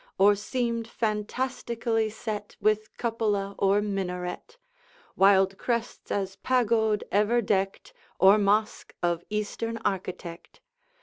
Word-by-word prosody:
Or 200 +2 +6
seemed 230 +2 -2
fantastically 225 0 -1
set 210 -1 -6
With 215 0 0
cupola 210 -4 -1
or 200 +1 +3
minaret, 190 - -4 0.6
Wild 195 0 +4
crests 235 -1 -3
as 195 -1 -2
pagod 225 -4 +2
ever 210 +4 +3
decked, 195 -3 -1 0.3
Or 195 +3 +7
mosque 210 +2 0
of 175 -1 0
Eastern 215 +2 -3
architect. 180 -3 -4
210 Hz, 105 wpm, -27 LUFS, 195-230 Hz, 0.6 s, Or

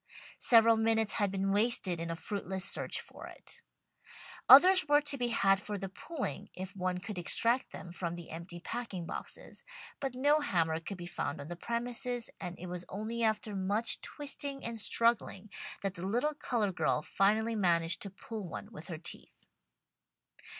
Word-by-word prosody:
Several 230 -1 +6
minutes 225 -1 +3
had 205 -1 +1
been 195 0 -1
wasted 205 -4 +3
in 165 0 -4
a 165 - -3
fruitless 190 +1 -1
search - - +1
for - - -11
it. - - -13 0.9
Others 365 +6 +9
were 290 0 +4
to 290 -1 +3
be 245 -3 -1
had 195 -4 +3
for 210 0 -5
the 195 0 -5
pulling, 215 - -4
if 185 +1 -7
one 185 -1 -2
could 190 +1 -6
extract 230 +8 +3
them 175 - -9
from 170 -1 -4
the 175 -1 -10
empty 170 +2 -8
packing 210 -4 -5
boxes, - - -6 0.4
but 270 -3 -4
no 290 +4 +3
hammer 165 - 0
could 180 +4 -7
be 175 - -8
found 145 -4 -4
on 140 - -8
the 175 - -5
premises, 240 +4 -2
and 180 -1 -6
it 180 - -9
was 180 0 -5
only 220 +4 -4
after 215 -2 0
much 200 +4 0
twisting 280 -1 -4
and 230 -1 -3
struggling 215 -2 +1 0.3
that 195 -2 -1
the 175 - -9
little 245 +9 0
coloured 225 -8 -1
girl 155 -1 +1
finally 220 +6 +1
managed 170 -4 +2
to 200 - -3
pull 200 0 -8
one 205 - -8
with 165 -7 -9
her 170 -4 -6
teeth. 170 - -9
205 Hz, 175 wpm, -32 LUFS, 180-235 Hz, 0.9 s, Others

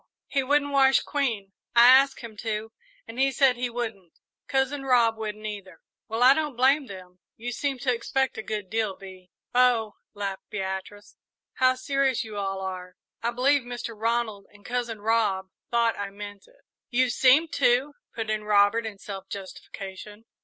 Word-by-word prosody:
"He 275 - 0
wouldn't 285 +2 +1
wash 270 -1 +5
Queen. 230 -9 -2 0.2
I 235 0 +8
asked 265 +2 +6
him 230 -3 -9
to, 220 0 -3 0.4
and 235 - -8
he 270 0 +3
said 265 -2 +4
he 245 0 -2
wouldn't. 220 -7 -5 0.3
Cousin 270 +1 0
Rob 240 -4 +4
wouldn't, 215 -1 -6
either." 195 -5 -7 0.3
"Well, 225 +2 0
I 260 +2 +9
don't 300 -3 -2
blame 270 +3 +3
them. 185 -2 -11 0.2
You 240 +2 -5
seem 275 +3 -2
to 250 0 0
expect 265 +3 -1
a - - -4
good 215 -2 -4
deal, 220 -3 0
Bee." 185 -1 -12 0.2
"Oh," 245 -3 +3 0.2
laughed 200 -2 -5
Beatrice, 195 +1 -6 0.4
"how 255 0 +3
serious 270 -1 0
you 220 -2 -9
all 195 -1 -3
are! 185 -1 -6 0.3
I 235 - 0
believe 265 +4 +2
Mr. 240 -1 -6
Ronald 220 -2 -1
and 205 -1 -20
Cousin 240 -3 -3
Rob 205 -4 +1 0.2
thought 235 -1 +2
I 200 -1 -3
meant 205 0 -10
it!" - - -25 0.3
"You 250 0 +2
seemed 275 +7 +4
to," 265 +2 +2 0.2
put 225 -2 -3
in 215 0 -2
Robert, 210 +2 +3
in 210 -2 -8
self 195 -1 -8
justification. 200 +2 -9
230 Hz, 170 wpm, -26 LUFS, 205-255 Hz, 0.4 s, I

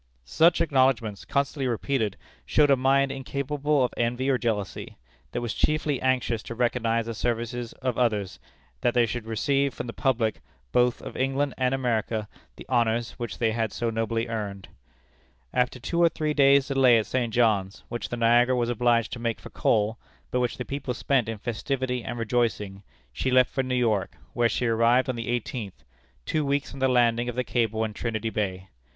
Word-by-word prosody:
Such 165 - +4
acknowledgments, 130 -8 +1
constantly 140 -1 -1
repeated, 115 -3 -1 0.3
showed 145 - +3
a - - +7
mind 135 +1 +2
incapable 140 +1 -1
of 125 - -1
envy 120 +3 0
or 130 - +1
jealousy; 105 -5 -3 0.3
that - - -3
was 120 -3 -2
chiefly 150 -3 0
anxious 125 -3 +1
to 115 - -7
recognize 115 -1 0
the 115 - -4
services 120 +1 -3
of 125 -2 -1
others, 105 -6 0 0.4
and - - -40
that 120 - +2
they 120 -1 +5
should 115 0 -5
receive 135 +5 0
from - - -5
the 115 - -6
public, 115 -5 0 0.3
both 125 0 +2
of - - -8
England 135 +1 0
and 130 0 +1
America, 115 -4 -1 0.3
the - - -11
honors 120 -2 +1
which 120 -1 -4
they 115 -2 +1
had 110 -2 -1
so 120 -1 -2
nobly 115 +1 -1
earned. 100 -4 -5 0.8
After 125 0 0
two 170 +8 -1
or 170 - +6
three 155 -2 -2
days' 140 -1 +5
delay 130 -3 +5
at 110 - 0
St. 120 -3 -1
John's, 105 -4 +1
which 120 -3 -5
the 120 - -4
Niagara 120 +2 +4
was 120 -1 0
obliged 120 -1 +2
to 120 - -5
make 115 -1 -2
for - - -11
coal, 110 +1 +1 0.3
but 125 - +1
which 120 -3 -1
the 125 - -4
people 135 -3 -4
spent 125 -2 +1
in 115 - -4
festivity 125 +3 -2
and 120 - -5
rejoicing, 115 -4 -1 0.3
she 130 - -1
left 130 -1 +4
for 135 - 0
New 130 -1 -2
York, 110 -6 0 0.2
where 120 -1 +2
she 125 - -1
arrived 115 +3 +3
on 130 - -1
the 115 0 -5
eighteenth 120 -4 -4 0.4
two 155 - 0
weeks 140 +1 -1
from 135 - -9
the 130 - +3
landing 120 -1 +2
of 120 - -5
the 125 - 0
cable 110 -3 0
in 110 -1 -3
Trinity 110 0 -3
Bay. 95 -3 -3
120 Hz, 190 wpm, -26 LUFS, 115-130 Hz, 0.8 s, a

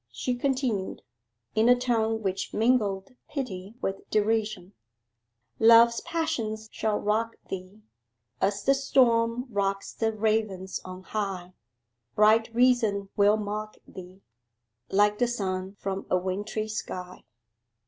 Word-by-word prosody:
she 120 - -2
continued, 245 -6 -1 0.5
in 220 +2 +3
a 245 - +7
tone 225 -3 0
which 190 -1 -3
mingled 210 -4 +1 0.2
pity 210 -7 -5
with 195 0 -4
derision 210 -3 0 0.9
'"Love's 230 +1 +7
passions 235 -10 -2
shall 215 -1 -1
rock 225 +2 0 0.2
thee 190 +3 -7 0.6
As 200 +1 0
the 275 - +4
storm 245 -3 +2
rocks 195 -1 -1
the 225 -1 0
ravens 215 -3 -1
on 185 0 -9
high, 190 -4 -4 0.6
Bright 220 +1 +5
reason 230 -5 +2
will 205 +1 +4
mock 215 0 -4
thee 185 +1 -12 0.7
Like 205 +1 +3
the 245 - +3
sun 190 -4 -3
from 195 -1 -4
a 185 - +3
wintry 205 +4 -3
sky." 180 -4 -6
215 Hz, 115 wpm, -27 LUFS, 195-230 Hz, 0.9 s, a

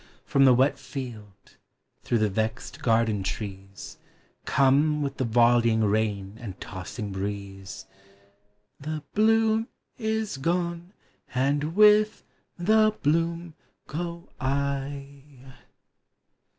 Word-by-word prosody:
From 140 -1 +4
the 130 - +7
wet 130 +3 +2
field, 110 -8 -9 0.4
through 120 - 0
the 110 -1 +2
vexl 110 +2 -3
garden 110 -3 +2
trees, 95 0 -6 0.5
Come 145 +2 +3
with 140 -1 -4
the - - 0
volleying 115 -1 +4
rain 105 -1 -1
and 100 -5 -8
tossing 100 +2 -6
breeze: 95 -1 -6 0.9
The 155 +1 -5
bloom 225 +1 +3 0.3
is 220 - -2
gone, 170 +4 -2 0.4
and 145 +5 0
with 210 +1 +5 0.3
the 215 +4 +3
bloom 165 +2 0 0.3
go 170 +2 -5
I! 140 0 -4
135 Hz, 100 wpm, -26 LUFS, 110-170 Hz, 0.9 s, the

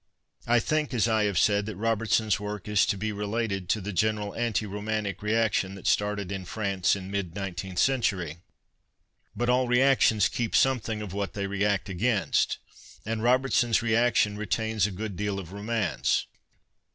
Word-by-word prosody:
I 120 +1 +4
think, 150 +2 -1
as 115 -1 +2
I 110 -2 +2
have 100 -2 -1
said, 100 0 +3
that 110 - -5
Robertson's 110 0 +1
work 105 -1 -6
is 105 -1 +3
to 100 - 0
be 110 +2 -2
related 105 -2 -3
to 110 - +2
the 100 +2 -5
general 105 +2 0
anti 115 -2 -1
romantic 105 -1 -3
reaction 105 -3 +1
that 95 - -12
started 105 -2 0
in 95 -1 -4
France 100 -1 0
in 95 -1 -7
mid 100 -4 -3
nineteenth 95 -2 -5
century. 95 - +1 1.0
But 120 +3 -1
all 125 0 +3
reactions 125 -4 +4
keep 115 -2 -2
something 115 -5 +1
of 95 -3 -7
what 100 -1 -3
they 100 -1 -3
react 100 0 0
against, 100 -3 +1 0.5
and 110 0 -2
Robertsons 120 -1 +2
reaction 115 -2 +2
retains 110 0 0
a - - -6
good 100 +1 -5
deal 105 +1 -2
of 90 -3 -7
romance. 105 -3 0
105 Hz, 165 wpm, -27 LUFS, 100-115 Hz, 1.0 s, I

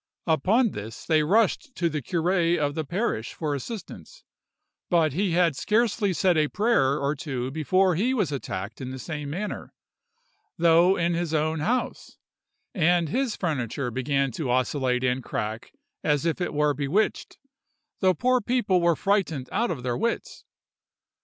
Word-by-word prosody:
Upon 195 - +2
this 105 +2 -8
they 155 -2 +3
rushed 220 - +1
to 170 - 0
the 155 -2 -2
curé 175 +3 +1
of 145 -2 0
the 160 - -2
parish 175 - -2
for 155 -3 -2
assistance; 225 - -8 0.7
but 165 -5 +3
he 185 +2 0
had 170 -4 +3
scarcely 215 - +1
said 180 -1 +2
a 155 -1 +3
prayer 150 - +2
or 140 +1 0
two 135 -4 -4
before 185 +5 +2
he 215 +10 +1
was 205 - 0
attacked 110 -6 -5
in 130 - -5
the 130 - -6
same 150 +1 -5
manner, 195 +8 -5 0.8
though 170 +3 +5
in 170 0 +1
his 170 -2 -1
own 155 +1 0
house; 240 +11 -2 0.6
and 175 -2 +2
his 260 - -1
furniture 135 - -2
beginning 135 +2 0
to 130 +2 -4
oscillate 130 0 0
and 125 0 0
crack 110 +1 -4 0.3
as 150 +1 +1
if 165 +2 -1
it - - -1
were 150 0 +2
bewitched, 145 +10 -1 0.6
the 185 -2 +3
poor 255 +7 +2
people 205 -6 +1
were 170 -1 +3
frightened 175 -10 0
out 235 +2 0
of 135 -7 -4
their 125 -1 -1
wits. 230 +2 -3
160 Hz, 160 wpm, -25 LUFS, 140-190 Hz, 0.8 s, though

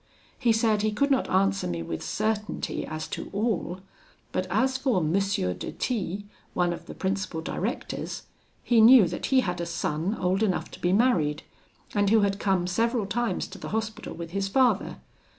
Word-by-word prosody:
He 240 -3 +3
said 220 -2 +2
he 215 0 +1
could 280 +7 +1
not 265 - +2
answer 195 - +2
me 85 -1 -3
with 80 0 -5
certainty 215 0 -2
as 155 0 -5
to - - -5
all, 200 -4 -1 0.5
but 185 - -1
as 255 +8 +2
for 265 -4 +1
M. 160 -1 0
de 195 - 0
T, 205 -5 -2 0.3
one 175 -1 +2
of - - -9
the - - -8
principal 190 -3 -2
directors, 160 - -4 0.4
he 235 -2 +4
knew 230 -3 +8
that - - -4
he 265 -1 +4
had 180 -5 -2
a - - -2
son 165 +4 -1
old 185 +1 0
enough 200 -5 0
to - - -10
be 175 - +1
married, 175 -9 +2 0.5
and 205 -1 +2
who 220 0 +5
had 200 0 +1
come 190 -3 +1
several 225 +4 +1
times 235 +4 -1
to - - -10
the - - -6
Hospital 220 0 -3
with 170 -1 -7
his 195 +1 -1
father. 240 -1 +2
200 Hz, 185 wpm, -27 LUFS, 180-225 Hz, 0.5 s, knew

